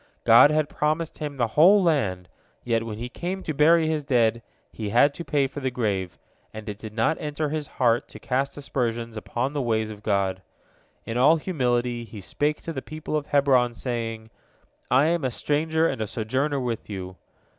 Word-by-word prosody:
God - - +8
had 155 -1 +1
promised 155 +2 -2
him 145 -2 -5
the 120 - +2
whole 185 - +6
land, 100 - 0 0.4
yet 115 -2 +1
when 110 -2 -6
he 120 +2 -4
came 180 +8 -5
to 155 - -3
bury 160 +3 +4
his 155 -2 -1
dead, 115 -4 +2 0.3
he 110 -2 -5
had 125 +6 +4
to 170 - -7
pay 145 -4 +1
for 135 +2 -6
the 130 -2 -1
grave, 100 -7 -2 0.3
and 110 -1 -9
it 105 -1 -6
did 110 -1 -8
not 115 +7 +1
enter 150 0 -2
his 150 -1 -3
heart 120 0 +1
to - - -12
cast 135 +3 -2
aspersions 120 -5 -3
upon 120 +5 -3
the 145 - -1
ways 110 -3 0
of 105 -1 -10
God. 100 -3 0 0.6
In 115 - -3
all 145 +6 +6
humility 125 -8 -1
he 110 -2 -10
spake 145 +10 -2
to 165 - -5
the 135 - -4
people 155 +1 -6
of 150 -1 -2
Hebron, 130 -5 +3
saying, 115 -2 -4 0.6
"I 135 +3 +4
am 170 -1 +1
a 130 - +1
stranger 160 +5 0
and 110 - -3
a 110 - -1
sojourner 130 +7 -1
with 120 -4 -4
you." 95 -2 -6
130 Hz, 195 wpm, -25 LUFS, 115-150 Hz, 0.6 s, God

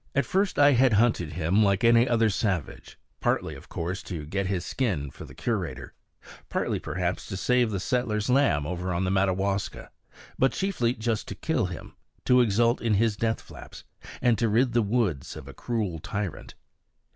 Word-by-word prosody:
At 140 - +2
first 195 -3 0
I 145 0 +6
had 130 -2 +4
hunted 100 -7 +2
him 90 +6 +2
like 100 0 +2
any 115 +2 +5
other 115 -2 +3
savage; 95 -6 -3 0.2
partly, - - 0
of - - -13
course, 90 +3 -4
to 80 -6 -6
get 95 +5 -2
his 95 -2 -2
skin 90 - -2
for - - -10
the - - -13
curator; - - -3 0.6
partly, - - -1
perhaps, 90 0 -3
to 95 - -5
save 125 +5 +2
the 100 -3 -2
settler's 110 -1 -1
lambs 125 - +3
over 90 +2 -3
on 90 - 0
the 95 - 0
Madawaska; 95 0 -1 0.5
but 135 - +3
chiefly 130 -12 0
just 110 -1 -2
to - - -6
kill - - 0
him, - - -8 0.3
to 125 0 +5
exult 115 +2 +2
in 115 -3 +2
his 110 +1 +2
death 115 +1 -1
flaps, - - -12 0.4
and 120 -3 +3
to 115 -1 +2
rid 120 +3 +2
the 120 - +4
woods 100 - -1
of 65 - -9
a 70 - -9
cruel 105 - -3
tyrant. 100 +2 -5
105 Hz, 180 wpm, -27 LUFS, 90-120 Hz, 0.6 s, I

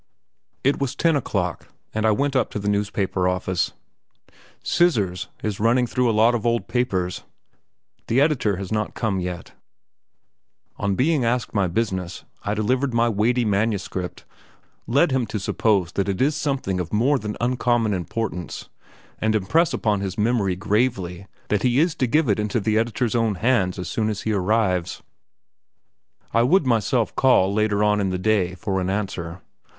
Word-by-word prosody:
It 140 +2 +2
was 135 -2 -1
ten 165 -2 +2
o'clock, 100 -10 -2 0.3
and 110 0 +1
I - - +5
went 140 +5 0
up 130 - +2
to - - -5
the 100 0 -4
newspaper 100 -2 0
office. 90 -1 -1 0.9
"Scissors" 105 - +1 0.2
is 105 -3 -2
running 120 +3 +3
through 125 0 +1
a 110 -1 +1
lot 115 +2 +5
of 115 -3 -1
old 120 0 0
papers. 95 -8 -1 0.9
The 120 - +2
editor 140 -9 +2
has 95 +1 -6
not 105 -1 -2
come 105 -5 -1
yet. 90 -1 -5 1.2
On 100 -1 0
being 145 - +2
asked 115 -1 -1
my 100 -3 +2
business, 95 -2 -2 0.2
I 105 - -2
delivered 125 +4 0
my 120 0 +3
weighty 115 +3 +1
manuscript, 100 -3 -2 0.6
lead 140 +7 +3
him 130 -3 0
to 105 - -3
suppose 95 -2 +1
that 100 0 -1
it 95 - -2
is 145 +3 +2
something 135 -10 -1
of 85 -2 -4
more 130 +7 +2
than 105 -2 -5
uncommon 120 -2 +1
importance, 90 0 -4 0.5
and 110 0 +1
impress 160 - +2
upon 105 -4 0
his 95 -1 -4
memory 105 -4 +1
gravely 100 -3 -1 0.2
that 105 -2 +1
he 125 +1 +2
is 165 +1 +3
to 130 - +1
give 150 +4 +2
it 105 -1 +1
into 105 +2 0
we 110 +1 0
editor's 115 +1 0
own 115 -3 +1
hands 105 -4 +1
as 90 -2 -5
soon 110 -1 -1
as 105 -2 -3
he 110 - 0
arrives. 95 -3 0 1.3
I 115 - +4
would 155 +7 +3
myself 115 -1 +1
call 100 -7 +4
later 105 -1 +1
on 105 0 +2
in 95 - 0
the 90 - -1
day 95 -2 +1
for 95 0 -2
an 90 - -1
answer. 95 -4 -3
110 Hz, 170 wpm, -23 LUFS, 95-120 Hz, 1.3 s, I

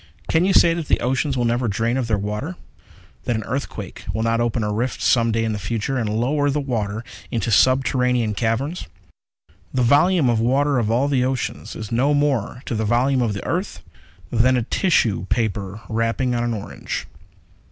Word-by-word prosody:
Can 165 +3 +2
you 195 - +2
say 165 - +6
that 165 -3 -4
the - - +2
oceans 130 +2 0
will 120 - +1
never 120 +1 +1
drain 115 +4 0
of 130 -3 -1
their 110 -2 +1
water? 105 - -4 0.7
That 120 - 0
an 110 - -2
earthquake 135 +6 -5
will 110 - -2
not 115 +1 +1
open 120 -1 0
a 105 0 -1
rift 120 +4 -2
some 115 -2 +3
day 115 0 0
in 110 - -1
the 105 - -3
future 115 +5 -2
and 110 -3 -1
lower 135 +7 +1
the 145 +1 0
water 110 -5 -2 0.3
into 115 -1 -1
subterranean 125 -2 +3
caverns? 120 - -2 0.8
The 125 - +1
volume 150 +5 +4
of 120 -2 +2
water 135 +3 +2
of 110 -3 0
all 125 +5 +2
the 135 -3 +1
oceans 130 -1 -3
is 110 0 -7
no 135 +5 +2
more 135 -4 0
to - - -3
the 110 -1 -1
volume 125 +4 +2
of 115 -4 0
the 100 - -6
earth - - -3 0.5
than 125 +2 +3
a 120 - 0
tissue 115 - +1
paper 105 -3 -2
wrapping 115 +3 0
on 120 0 0
an 120 -1 -1
orange. 105 -1 -5
120 Hz, 195 wpm, -22 LUFS, 110-135 Hz, 0.8 s, say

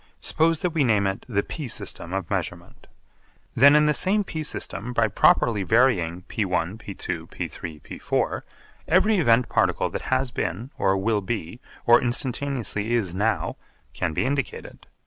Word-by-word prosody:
Suppose 160 0 +1
that 180 - 0
we 160 -3 +1
name 105 -5 +2
it 95 +4 -3
the 100 -3 0
p 150 -5 -6
system 90 -6 -1
of 95 -3 -4
measurement. - - -5 0.7
Then 140 +4 +7
in 150 0 +5
the 150 - +3
same 200 +7 +2
p 160 -5 -5
system 125 -5 -3
by 115 -2 +3
properly 105 0 +3
varying 95 -5 +2
(p₁, 95 -2 -2
p₂, 90 -6 -5
p₃, 80 -3 -7
p₄) - - -2 0.5
every 200 +5 +3
event 120 -5 +3
particle - - +1
that - - -4
has 130 -1 +1
been, 105 - -4
or 95 0 +2
will 105 +2 0
be, 105 0 -4 0.3
or 120 0 +6
instantaneously 120 -3 -1
is 100 -7 -1
now, 105 +4 -1 0.4
can 90 -3 -2
be 80 - -1
indicated. 135 0 -4
115 Hz, 155 wpm, -24 LUFS, 95-135 Hz, 0.7 s, Then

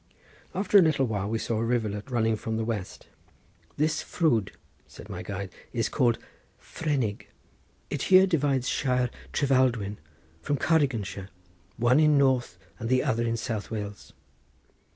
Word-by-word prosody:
After 200 +1 +5
a - - +7
little 150 -6 +2
time 105 -2 -2
we 115 - 0
saw 110 0 -2
a - - 0
rivulet 110 -1 -1
running 115 -3 +1
from 110 +1 -3
the 110 - -1
west. 105 -5 -4 0.7
"This 155 +2 +1
ffrwd," 120 - +1 0.4
said - - -13
my - - -5
guide, 100 -1 -5 0.2
"is 115 -2 0
called 120 -5 +2 0.4
Frennig. 135 -10 -2 0.6
It 145 - -2
here 190 0 +8
divides 145 -7 +1
shire 125 -3 +1 0.2
Trefaldwyn 125 -7 +1 0.4
from 145 +10 -1
Cardiganshire, 125 - 0 0.5
one 120 +4 +4
in 150 -2 +5
North 130 -3 +2 0.2
and 115 -1 -4
the 130 0 +3
other 115 - 0
in 115 0 0
South 110 -3 -4
Wales." 105 -2 -6
120 Hz, 145 wpm, -27 LUFS, 110-140 Hz, 0.7 s, here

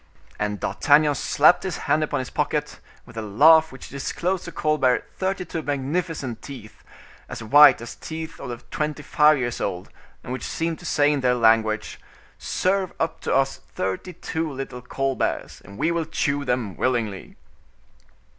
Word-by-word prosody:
And 105 -1 -2
D'Artagnan 150 0 +3
slapped 150 +4 +4
his 185 -3 -3
hand 155 - +2
upon 145 -1 -1
his 130 - -8
pocket, - - -2 0.3
with 120 - -14
a - - -2
laugh 155 +10 +5
which 130 - -11
disclosed 170 +6 -2
to - - -7
Colbert 150 -5 +1
thirty 190 -1 -2
two 165 - -4
magnificent 145 -2 -3
teeth, 125 -6 -11 0.5
as - - -6
white 140 +2 +7
as 120 - -7
teeth 160 0 -7
of 120 -1 -7
twenty 150 -1 -3
five 150 +1 +4
years 120 -2 -3
old, 90 -2 -4 0.3
and 125 - -5
which 130 - -5
seemed 165 0 -2
to 180 - -8
say 145 -1 +3
in 140 - -1
their 125 -1 +2
language: 110 -2 +2 0.4
"Serve 190 0 0
up 165 - -1
to - - 0
us 135 0 +1 0.2
thirty 95 - -3
two 160 -2 -4
little 135 -2 -6
Colberts, 135 +2 -2
and 100 +1 -13
we 165 - +1
will 170 -1 -1
chew 145 -2 -1
them 125 -7 -1
willingly." 115 -7 -2
140 Hz, 165 wpm, -23 LUFS, 120-160 Hz, 0.5 s, white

